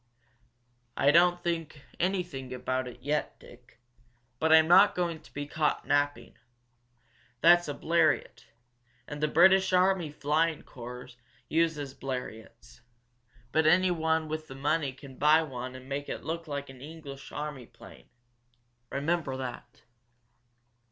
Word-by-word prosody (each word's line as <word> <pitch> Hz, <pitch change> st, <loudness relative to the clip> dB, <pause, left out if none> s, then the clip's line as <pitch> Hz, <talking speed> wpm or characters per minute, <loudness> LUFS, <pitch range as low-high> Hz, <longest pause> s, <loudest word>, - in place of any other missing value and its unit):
"I 140 Hz, -, +4 dB
don't 175 Hz, +2 st, +4 dB
think 165 Hz, -4 st, -3 dB, 0.2 s
anything 175 Hz, -9 st, -2 dB
about 130 Hz, 0 st, -2 dB
it 125 Hz, -, -11 dB
yet, 150 Hz, +2 st, -2 dB
Dick. 120 Hz, -1 st, -18 dB, 0.6 s
But 160 Hz, 0 st, +2 dB
I'm 160 Hz, 0 st, +7 dB
not 190 Hz, +4 st, +6 dB
going 170 Hz, -3 st, -2 dB
to -, -, -19 dB
be 145 Hz, 0 st, -5 dB
caught 150 Hz, +1 st, -1 dB
napping. 145 Hz, 0 st, -1 dB, 1.0 s
That's 175 Hz, 0 st, +6 dB
a 145 Hz, -, -4 dB
Bleriot 160 Hz, -7 st, 0 dB, 0.6 s
and 150 Hz, 0 st, -7 dB
the 150 Hz, -, +2 dB
British 190 Hz, +4 st, +5 dB
army 185 Hz, -3 st, +3 dB
flying 155 Hz, +2 st, 0 dB
corps 125 Hz, +1 st, -10 dB, 0.4 s
uses 155 Hz, -4 st, 0 dB
Bleriots. 125 Hz, -4 st, -8 dB, 0.7 s
But 155 Hz, +2 st, +2 dB
anyone 160 Hz, -2 st, +2 dB
with 155 Hz, 0 st, -5 dB
the 135 Hz, -, -10 dB
money 145 Hz, +1 st, 0 dB
can 135 Hz, 0 st, -13 dB
buy 155 Hz, +2 st, +5 dB
one 130 Hz, -3 st, -6 dB
and 130 Hz, 0 st, -11 dB
make 140 Hz, +1 st, -4 dB
it -, -, -5 dB
look 165 Hz, +1 st, -4 dB
like 140 Hz, -2 st, -5 dB
an 130 Hz, -1 st, -15 dB
English 145 Hz, -2 st, -10 dB
army 145 Hz, -5 st, -6 dB
plane. -, -, -16 dB, 0.8 s
Remember 145 Hz, -2 st, -1 dB
that." 130 Hz, -3 st, -8 dB
150 Hz, 130 wpm, -29 LUFS, 135-165 Hz, 1.0 s, I'm